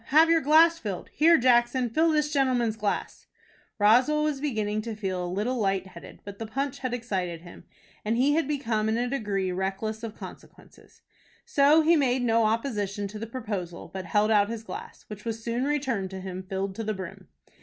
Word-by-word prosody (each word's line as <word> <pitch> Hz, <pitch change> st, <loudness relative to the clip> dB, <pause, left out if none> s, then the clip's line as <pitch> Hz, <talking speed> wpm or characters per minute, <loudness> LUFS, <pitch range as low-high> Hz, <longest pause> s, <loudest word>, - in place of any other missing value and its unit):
Have 315 Hz, +5 st, +5 dB
your 330 Hz, -1 st, +4 dB
glass 325 Hz, +3 st, +5 dB
filled. 200 Hz, -, -6 dB
Here 330 Hz, +2 st, +5 dB
Jackson, 245 Hz, 0 st, +3 dB
fill 320 Hz, +7 st, +3 dB
this 300 Hz, -1 st, 0 dB
gentleman's 250 Hz, -5 st, +1 dB
glass." 210 Hz, -2 st, -3 dB, 0.5 s
Roswell 250 Hz, +9 st, +4 dB
was 300 Hz, -3 st, -1 dB
beginning 215 Hz, -7 st, -1 dB
to 225 Hz, 0 st, -5 dB
feel 190 Hz, -4 st, -3 dB
a -, -, -3 dB
little 225 Hz, +7 st, -1 dB
light 195 Hz, -2 st, 0 dB
headed; 190 Hz, -, -13 dB
but 200 Hz, 0 st, -9 dB
the 225 Hz, -, -5 dB
punch 275 Hz, +4 st, -3 dB
had 255 Hz, -2 st, -3 dB
excited 190 Hz, -9 st, -3 dB
him, 175 Hz, 0 st, -13 dB, 0.4 s
and 220 Hz, +2 st, 0 dB
he 275 Hz, +4 st, +3 dB
had 320 Hz, -2 st, +1 dB
become 230 Hz, -7 st, -1 dB
in 220 Hz, -, +1 dB
a 245 Hz, +1 st, 0 dB
degree 205 Hz, -8 st, -2 dB
reckless 195 Hz, +4 st, -3 dB
of 225 Hz, -2 st, -6 dB
consequences. -, -, -14 dB, 0.4 s
So 295 Hz, +3 st, +4 dB
he 335 Hz, +2 st, +5 dB
made 260 Hz, -4 st, +1 dB
no 230 Hz, -1 st, +3 dB
opposition 210 Hz, -3 st, -1 dB
to 210 Hz, +1 st, -8 dB
the 225 Hz, -, -5 dB
proposal, 205 Hz, -8 st, -6 dB
but 190 Hz, -1 st, -5 dB
held 210 Hz, +5 st, +2 dB
out 205 Hz, -1 st, +4 dB
his 230 Hz, -1 st, -5 dB
glass, -, -, -9 dB
which 210 Hz, -1 st, -9 dB
was 225 Hz, -1 st, -4 dB
soon 235 Hz, +3 st, -1 dB
returned 265 Hz, -10 st, -1 dB
to 190 Hz, 0 st, -7 dB
him 185 Hz, 0 st, -6 dB
filled 190 Hz, +1 st, -4 dB
to 225 Hz, -, -3 dB
the 215 Hz, 0 st, -2 dB
brim. 185 Hz, -2 st, -8 dB
225 Hz, 195 wpm, -27 LUFS, 200-270 Hz, 0.5 s, Have